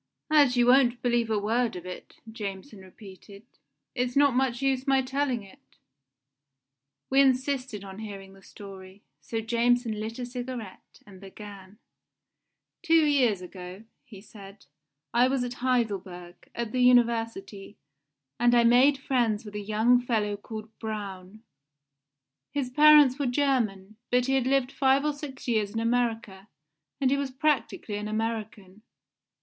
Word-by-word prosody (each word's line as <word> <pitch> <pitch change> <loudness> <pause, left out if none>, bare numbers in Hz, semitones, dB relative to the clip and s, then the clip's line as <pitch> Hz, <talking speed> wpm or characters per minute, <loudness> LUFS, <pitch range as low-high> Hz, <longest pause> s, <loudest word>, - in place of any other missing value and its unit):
"As 285 -5 +4
you 240 - +4
won't 245 -1 +4
believe 240 -2 +1
a 220 - +1
word 225 +2 0
of 180 0 -8
it," 180 0 -9 0.2
Jameson 205 +1 -7
repeated, 195 +1 -14 0.5
"it's 245 0 -2
not 280 -1 +4
much 250 -1 0
use 270 0 -1
my 270 -1 +3
telling 265 -3 -2
it." 195 - -20 1.3
We 270 +1 +5
insisted 260 -4 0
on 195 0 -10
hearing 195 -3 -9
the 195 - -18
story, 195 -1 -13 0.2
so 225 +10 -4
Jameson 235 -1 0
lit 220 +2 -5
a 250 - -4
cigarette, 245 -4 -8
and 195 -2 -15
began: 200 0 -12 1.0
"Two 330 -3 +4
years 250 -10 +2
ago," 180 +2 -10 0.2
he 220 -8 -13
said, 200 -1 -14 0.5
"I 240 +2 +4
was 260 -1 0
at 245 0 -4
Heidelberg, 195 -8 -3
at 235 -2 -4
the 255 - -1
University, 230 -5 +1 0.6
and 240 0 +4
I 235 - +5
made 250 +4 +5
friends 240 -5 -1
with 210 - -10
a 210 - -4
young 220 +4 +2
fellow 215 -4 -1
called 215 +1 -9
Braun. 205 -2 -7 1.1
His 275 -3 -3
parents 295 -1 +6
were 280 - 0
German, 230 -7 -1
but 250 0 +2
he 270 - 0
had 265 -2 +1
lived 270 -1 +1
five 275 +1 +2
or 300 - +1
six 285 -3 -9
years 215 -4 0
in 225 - -4
America, 225 -4 -2 0.5
and 265 -2 +1
he 280 - +2
was 280 -1 -2
practically 260 -6 -1
an 210 0 -5
American. 215 -2 -5
230 Hz, 145 wpm, -27 LUFS, 205-255 Hz, 1.3 s, parents